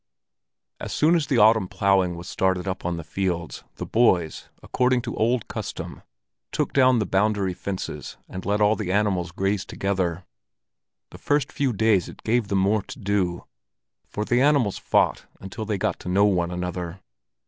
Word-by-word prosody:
As - - -6
soon 155 +3 +3
as 155 -5 0
the 130 - +1
autumn 110 -2 +5
ploughing 95 -3 +2
was 85 +1 -9
started 95 0 0
up 95 -2 -4
on 85 -1 -1
the 85 - -6
fields, 85 0 -3
the - - -5
boys, 90 -9 +1
according 125 -1 +1
to 120 - -5
old 115 +1 +1
custom, - - -6 0.5
took - - -1
down 130 -2 +5
the 110 - +1
boundary 100 0 +1
fences 95 +1 -6
and 95 - -7
let 105 +2 0
all 105 +1 +4
the 100 -5 -3
animals 95 -4 +1
graze 95 +2 -1
together. 95 -3 -2 0.9
The - - -12
first 145 -1 0
few 140 -2 0
days 110 -4 +2
it - - -13
gave 115 -1 +1
them 100 - 0
more 100 +3 +2
to 130 +8 -10
do, 100 -6 -1 0.6
for 105 - -3
the 120 +2 +2
animals 140 -8 +2
fought - - +1
until 95 +3 -6
they 105 -1 -1
got - - -1
to - - -7
know 100 +3 +4
one 90 -4 +1
another. 90 0 -4
100 Hz, 175 wpm, -24 LUFS, 90-110 Hz, 0.9 s, autumn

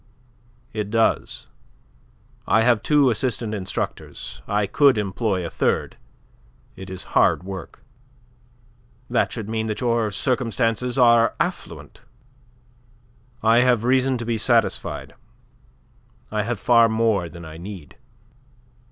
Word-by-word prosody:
"It 105 -2 -3
does. 115 +1 0 1.0
I 110 - +4
have 120 -3 +3
two 145 -1 +3
assistant 115 -1 -1
instructors. 95 -3 -5
I 105 0 +1
could 135 +5 +4
employ 100 -2 -1
a - - -4
third. - - -1 0.8
It 95 0 -10
is 95 -1 -6
hard - - +3
work." 95 -4 -9 1.3
"That 120 - +1
should 110 -4 -5
mean 110 0 -2
that 110 - -3
your 115 -3 +1
circumstances 120 +1 -1
are 120 -2 +5
affluent." - - -5 1.4
"I 115 +1 +5
have 125 -3 +3
reason 130 +1 +2
to 120 - -5
be 115 -1 -1
satisfied. 115 -1 0 1.2
I 105 0 0
have 115 0 -3
far 115 +1 +5
more 110 -6 +1
than 85 0 -11
I 80 0 -10
need." 90 -3 -10
115 Hz, 115 wpm, -22 LUFS, 100-120 Hz, 1.4 s, are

